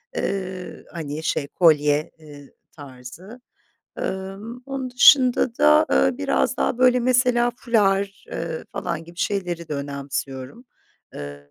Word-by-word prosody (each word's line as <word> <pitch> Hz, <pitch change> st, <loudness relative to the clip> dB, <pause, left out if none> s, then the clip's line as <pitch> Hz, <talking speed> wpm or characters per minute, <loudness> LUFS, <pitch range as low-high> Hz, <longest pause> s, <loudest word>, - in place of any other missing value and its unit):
Eee, 185 Hz, -2 st, -4 dB
hani, 155 Hz, -2 st, -5 dB
şey 145 Hz, -3 st, -1 dB
kolye, 150 Hz, -1 st, +2 dB
eee, 145 Hz, -3 st, -14 dB, 0.2 s
tarzı. 145 Hz, -, -12 dB, 0.6 s
Emm, 195 Hz, +5 st, -5 dB
onun 270 Hz, -2 st, -4 dB
dışında 250 Hz, -1 st, +5 dB
da, 75 Hz, 0 st, +5 dB
aaa, 80 Hz, +6 st, +2 dB
biraz 95 Hz, -, 0 dB
daha, -, -, -1 dB
böyle, 250 Hz, 0 st, +4 dB
mesela, 245 Hz, -1 st, +2 dB
fular, 200 Hz, -4 st, 0 dB
eee, 165 Hz, -1 st, -5 dB
falan 165 Hz, -1 st, -4 dB
gibi 170 Hz, +1 st, -15 dB
şeyleri 175 Hz, -3 st, -2 dB
de 150 Hz, -, -3 dB
önemsiyorum. 140 Hz, -, -5 dB, 0.5 s
Eee, 70 Hz, 0 st, -9 dB
170 Hz, 120 wpm, -22 LUFS, 145-235 Hz, 0.6 s, dışında